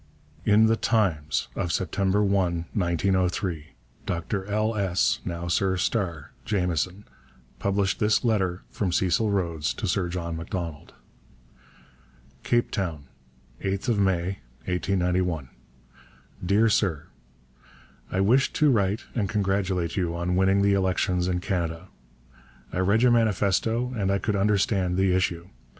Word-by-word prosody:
In 105 +1 +5
The 110 0 +3
Times 90 -11 0
of 85 - -2
September 95 +3 +1
1, 90 -4 +1
1903, 90 -2 0 0.4
Dr 95 +3 -2
L. 110 +2 0
S. 95 -3 +1
(now 85 0 -4
Sir 95 +2 +1
Starr) 85 -7 -2
Jameson 90 0 -1 0.5
published 100 -1 0
this 105 +2 +2
letter 95 -5 0
from 95 -4 -1
Cecil 95 +4 +1
Rhodes 85 -6 -1
to - - -3
Sir 90 -3 0
John 85 -1 -4
Macdonald: 85 -2 -6 1.5
CAPE 120 0 +1
TOWN, 80 -8 -3 0.5
8_th 95 0 0 0.2
May_ 95 -3 +2 0.4
1891. 90 -5 0 0.9
DEAR 100 +5 +3
SIR, 95 -8 +1 1.1
I 95 - +1
wished 125 +8 +3
to 150 -2 +4
write 100 -2 +1
and 105 -5 -1
congratulate 95 -5 0
you 85 -3 -1
on 85 +1 -1
winning 95 +1 +3
the 100 0 +4
elections 95 -2 +1
in 90 -1 -1
Canada. 85 -1 -3 0.8
I - - -1
read 100 +5 +3
your 125 - +6
manifesto 115 +2 +1
and 100 -4 0
I 100 - +2
could 105 +1 -1
understand 100 -2 +1
the 95 -1 +3
issue. 90 -1 -1
95 Hz, 125 wpm, -26 LUFS, 90-100 Hz, 1.5 s, your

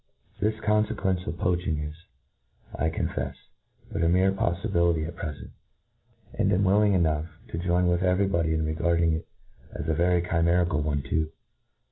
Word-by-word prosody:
This 110 +1 +1
confequencc 105 -3 0
of 85 - -4
poaching 90 -3 0
is^ 75 0 -4 0.8
I 80 - 0
co^ifcf^ 80 - -3 0.6
but - - -2
a 85 - +3
mere 95 +2 +4
poflibitity 85 -4 +1
at 85 - -8
prdcnt— 75 -4 -6 0.8
and - - +1
am 95 +2 +2
willing 100 +2 +4
enough 80 -3 +1 0.2
to 80 - -4
join 90 +1 +1
with 90 0 +2
?vcfy 95 +1 +2
body 80 -3 +1
in 80 0 0
regarding 85 +1 +1
it. 80 - -4 0.5
as - - -4
a 80 - +2
very 85 +2 +2
chimerical 85 -2 +2
one 75 -2 -1
too. 80 +3 -1
85 Hz, 155 wpm, -27 LUFS, 80-90 Hz, 0.8 s, mere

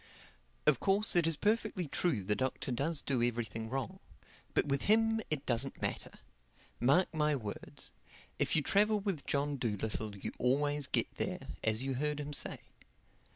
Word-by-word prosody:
Of 150 -5 +4
course 200 +1 +3
it 170 -2 +4
is 165 - +3
perfectly 210 -4 0
true 140 - 0
the 105 +3 +1
Doctor 130 +1 -2
does 145 +5 -1
do 130 -4 0
everything 115 -2 -1
wrong. 130 -3 -3 0.6
But - - +3
with 140 -1 0
him 225 +1 +4
it 150 -2 -2
doesn't 125 +2 0
matter. - - -2 0.7
Mark 140 +11 +3
my 150 -1 +2
words, 105 -6 -6 0.5
if - - +1
you 155 - +3
travel 210 +6 +3
with 195 -7 -2
John 145 0 0
Dolittle 110 -2 -2
you - - -4
always 145 +3 +2
get - - 0
there, - - -3
as 110 +2 +1
you 135 0 -1
heard 150 +3 -1
him 145 0 -5
say. - - -2
140 Hz, 160 wpm, -33 LUFS, 120-170 Hz, 0.7 s, Of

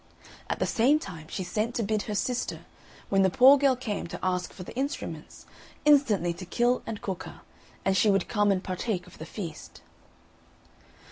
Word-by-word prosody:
At - - -1
the - - 0
same 255 +6 +3
time 165 - -8
she 185 - -4
sent 215 +6 -2
to 230 - 0
bid 215 0 0
her 210 - -2
sister, 245 +4 -2 0.5
when 195 -1 +3
the 190 - +4
poor 265 +7 +8
girl 275 -2 +3
came 220 -8 -4
to - - -7
ask 180 -1 -1
for 185 - -9
the - - -10
instruments, 275 +3 -5 0.4
instantly 240 - +4
to 180 - -9
kill 240 +5 +2
and 215 -2 -5
cook 190 -3 -4
her, - - -11 0.4
and 195 - +2
she 210 - +4
would 195 -2 +2
come 205 -2 +2
and 190 -1 0
partake 185 0 -3
of 180 - -16
the 160 - -7
feast. 170 -5 -8
205 Hz, 190 wpm, -28 LUFS, 185-245 Hz, 0.5 s, poor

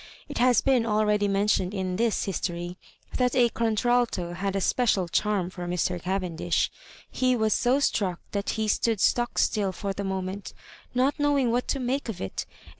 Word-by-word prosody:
It - - -5
has 250 0 +4
been 260 -4 +3
already 210 -2 +2
mentioned 200 -1 +1
in 185 -1 -2
this 225 +2 +1
his 195 - -2
tory 175 0 -4 0.4
that 250 0 +1
a 245 -2 +5
contralto 230 -5 0
had 195 +2 -2
a - - +1
special 195 -3 +1
charm 190 0 0
for 180 -1 -6
Mr. 180 0 -1
Cavendish. 180 -2 -1 0.4
He 255 -1 +2
was 220 -2 +2
so 255 +3 +2
struck 190 -10 0
that 200 0 -2
he 220 0 0
stood 220 0 +1
stock 240 +5 +1
still 205 -3 +1
for 195 +2 -4
the 200 - -4
moment, 190 +1 -4 0.4
not 260 +4 +2
knowing 285 -4 +2
what 245 +1 0
to 275 - -1
make 255 +1 -2
of 215 - -5
it; 95 - -4 0.2
and - - -18
210 Hz, 185 wpm, -26 LUFS, 185-240 Hz, 0.4 s, a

